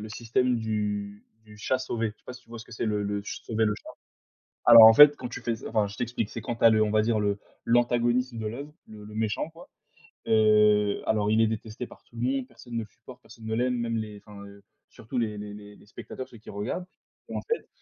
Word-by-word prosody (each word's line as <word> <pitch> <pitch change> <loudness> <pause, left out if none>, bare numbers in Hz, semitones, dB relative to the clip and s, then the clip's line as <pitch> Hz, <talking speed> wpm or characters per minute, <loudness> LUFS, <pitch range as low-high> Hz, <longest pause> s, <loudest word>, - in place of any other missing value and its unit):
le 110 - -7
système 120 +3 0
du 105 -2 -3 0.2
du 105 -1 -15
chat 120 +5 -1
sauvé. 115 -3 -2
Je - - -8
sais - - -35
pas - - -7
si 125 - -14
tu - - -32
vois 115 - -8
ce 110 - -10
que - - -14
c'est 115 - -3
le 105 -2 -1
le 100 0 -2
ch - - -6
sauver 115 -1 0
le 105 - +1
chat? - - -13 0.8
Alors 115 -1 +10
en 110 - +9
fait, 145 +4 +9
quand 125 - -6
tu 125 - -8
fais 115 0 -1
s 110 - -9
enfin, 105 -2 +1
je 100 +1 -10
t'explique, 120 -3 -3
c'est 115 - -7
quand 115 +2 -4
tu - - -6
as 115 - +9
le 110 -1 +4
on 105 - -1
va 110 0 +3
dire 110 0 +1
le 100 -1 0 0.3
l'antagoniste 120 +1 +2
de 110 -1 -5
l'œuvre, 135 +7 -6 0.2
le 105 -1 -12
le 105 0 -11
méchant, 110 +7 -2
quoi, 165 +1 -15 0.6
heu, 105 -1 +4
alors, 105 -1 +1
il 110 +1 +4
est 115 - +4
détesté 110 +2 -5
par - - -17
tout - - -23
le 115 - -6
monde, 130 +1 -1
personne 120 -2 -14
ne 115 - -1
le 115 - -4
supporte, 105 - -16
personne 115 - -14
ne 110 0 -2
l'aime, 125 +2 0
même 115 -1 -2
les 105 -2 -6
enfin, 100 -1 -11
heu, 100 0 -14 0.3
surtout 120 +4 -8
les 110 -3 -1
les 105 0 -7
les 105 0 -12
les - - -19
spectateurs, 120 +4 -8
ceux 120 - -15
qui 110 - -14
regardent 105 - -4 0.4
et - - -6
en - - -2
fait, 465 - -3
110 Hz, 265 wpm, -27 LUFS, 105-120 Hz, 0.8 s, Alors